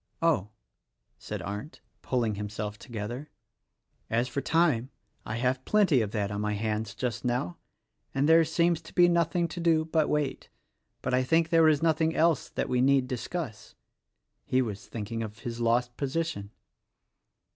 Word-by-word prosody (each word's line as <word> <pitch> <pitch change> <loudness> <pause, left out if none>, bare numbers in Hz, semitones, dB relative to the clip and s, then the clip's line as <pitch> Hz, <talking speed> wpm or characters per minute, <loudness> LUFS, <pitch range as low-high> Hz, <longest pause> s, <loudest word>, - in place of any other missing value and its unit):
"Oh," 150 - +2 0.7
said - - -6
Arndt, 105 - -6 0.2
pulling 120 -4 0
himself 105 0 -5
together, 120 +4 -6 0.8
"as 120 +3 +1
for 140 +3 -3
time, 150 -8 +2 0.4
I 110 - -3
have 125 +2 0
plenty 185 - +3
of 105 - -1
that 105 -1 -2
on 100 0 -2
my 105 0 0
hands 110 0 -2
just 120 -3 -3
now 125 +7 -1 0.3
— 110 +4 -42
and 135 +2 +2
there 165 +1 +7
seems 170 +1 +1
to 160 - -15
be 175 -1 +7
nothing 170 0 +2
to 175 - -6
do 165 -2 +3
but 155 -1 +1
wait; 150 -3 -1 0.5
but - - -1
I 130 - +4
think 165 +4 +2
there 165 -1 +5
is 155 0 +2
nothing 160 0 +2
else 165 -3 +2
that - - -2
we 125 -1 +1
need 135 -1 +4
discuss." 125 -1 -5 0.7
He 130 - +1
was 110 -5 -3
thinking 115 +1 -4
of 110 -1 -6
his 115 0 -5
lost 120 +1 +1
position. 140 -7 -2
130 Hz, 165 wpm, -28 LUFS, 110-160 Hz, 0.8 s, there